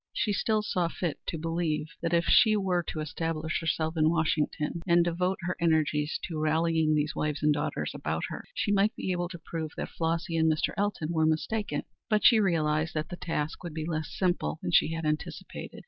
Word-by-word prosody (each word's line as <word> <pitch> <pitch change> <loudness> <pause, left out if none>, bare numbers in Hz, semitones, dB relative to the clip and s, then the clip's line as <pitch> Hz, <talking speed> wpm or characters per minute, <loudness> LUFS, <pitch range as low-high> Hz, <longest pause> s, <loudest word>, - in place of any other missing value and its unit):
She 210 - 0
still 215 +1 +1
saw 180 -4 0
fit 165 -1 -3
to 165 - -2
believe 165 -1 -1
that 170 - -1
if 170 0 +3
she 215 -2 +6
were 185 -3 +1
to 155 - -3
establish 160 0 -2
herself 160 0 -1
in 155 -1 +4
Washington 160 0 0
and 170 0 +5
devote 180 +2 0
her 180 +1 -2
energies 155 -2 +1
to 165 -4 -4
rallying 160 0 +2
these 150 0 0
wives 150 -1 -2
and 150 0 +5
daughters 145 - -2
about - - -3
her, - - -6
she 205 - 0
might 205 +3 +3
be 190 - -3
able 175 -1 -1
to 175 - -7
prove 160 -2 -5
that - - -3
Flossy 165 +1 -1
and 160 0 +4
Mr. 155 - +1
Elton 200 -6 -1
were 160 -2 +2
mistaken. 160 +1 -1 0.3
But 215 -1 +2
she 230 -3 +8
realized 160 -5 +1
that 155 0 -2
the - - -5
task 165 -2 -3
would 170 -3 -6
be 155 -1 -3
less 155 -2 -2
simple 175 - 0
than 90 - -1
she 155 - +4
had 165 -1 -3
anticipated. 155 0 -4
165 Hz, 205 wpm, -29 LUFS, 155-175 Hz, 0.3 s, she